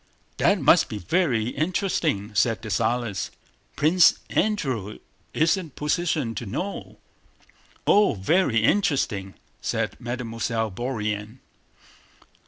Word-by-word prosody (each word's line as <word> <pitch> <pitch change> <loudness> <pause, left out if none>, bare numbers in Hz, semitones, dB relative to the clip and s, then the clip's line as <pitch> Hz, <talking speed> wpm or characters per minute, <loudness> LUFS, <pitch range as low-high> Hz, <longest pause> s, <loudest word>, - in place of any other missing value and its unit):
"That - - +3
must - - +4
be 105 - -4
very 120 - 0
interesting," 155 - -1
said 110 +2 +1
Dessalles. 115 -2 -1 0.5
"Prince 165 +4 +5
Andrew 130 - -1 0.3
is 160 +4 +2
in 185 -3 -5
a - - -16
position 150 -3 -1
to 115 - -6
know..." 180 - -5 0.9
"Oh, 205 - +4
very 115 - +2
interesting!" 115 - +1 0.3
said - - -2
Mademoiselle 115 -2 -3
Bourienne. 110 -1 -3
120 Hz, 100 wpm, -24 LUFS, 110-160 Hz, 0.9 s, Prince